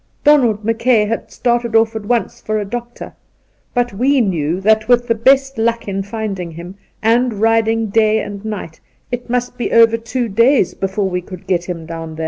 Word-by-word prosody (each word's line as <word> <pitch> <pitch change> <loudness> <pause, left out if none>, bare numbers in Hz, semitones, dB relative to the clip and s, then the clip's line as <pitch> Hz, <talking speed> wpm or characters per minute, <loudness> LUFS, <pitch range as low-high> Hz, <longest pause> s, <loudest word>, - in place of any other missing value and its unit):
Donald 240 -8 +3
Mackay 230 0 +2
had 225 +2 -3
started 240 -1 -1
off" 225 0 +3
at 210 -2 -5
once 240 -1 -1
for 215 0 -2
a 205 - -3
doctor; 240 +3 -7 0.6
but 245 -2 0
we 265 +7 +2
knew 175 -6 0
that, 215 +2 +2
with 245 0 +3
the 230 - +3
best 270 +3 +2
luck 230 0 0
in 195 0 -2
finding^him, 190 -5 -6 0.3
and 235 +1 +2
riding 225 +1 +2
day 220 +1 +2
and 205 -1 -6
night, 205 -7 -6 0.3
it 245 0 -5
must 245 0 -2
be - - -2
over 230 0 +5
two 235 +2 -3
days 230 0 +3
before 195 +1 -2
we 180 -1 -2
could 180 0 -11
get 175 -2 0
him 170 -3 -6
down 165 -1 -7
there. - - -11
220 Hz, 185 wpm, -17 LUFS, 195-240 Hz, 0.6 s, over